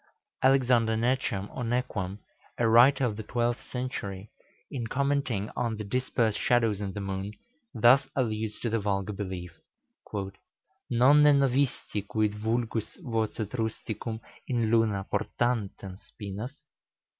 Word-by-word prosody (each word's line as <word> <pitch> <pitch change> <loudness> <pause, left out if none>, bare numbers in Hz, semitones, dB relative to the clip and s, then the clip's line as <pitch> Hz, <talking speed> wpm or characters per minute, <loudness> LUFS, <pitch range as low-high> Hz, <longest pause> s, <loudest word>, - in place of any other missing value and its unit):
Alexander 125 -4 +4
Necham, 115 -4 0
or 125 - -3
Nequam, 115 -5 -2 0.4
a 115 - +2
writer 125 +4 +6
of 110 -4 -2
the - - -3
twelfth 120 +2 -1
century, 110 -6 -4 0.4
in 120 -4 -3
commenting 135 -5 0
on 115 -3 -1
the 105 - -4
dispersed 115 -1 0
shadows 115 -4 +2
in 100 -1 -3
the 105 - -5
moon, 95 +1 -4 0.4
thus 130 +3 +6
alludes 110 -4 -1
to - - -1
the 115 - +1
vulgar 100 0 -1
belief: 95 -3 -5 1.4
"Nonne 140 +4 +6
novisti 130 -6 0
quid 105 -1 +1
vulgus 110 +1 -2
vocet 110 -2 -2
rusticum 110 -1 -3 0.3
in 115 -3 +1
luna 110 -4 +2
portantem 105 -3 -1
spinas? 105 +8 -7
115 Hz, 120 wpm, -28 LUFS, 105-125 Hz, 1.4 s, writer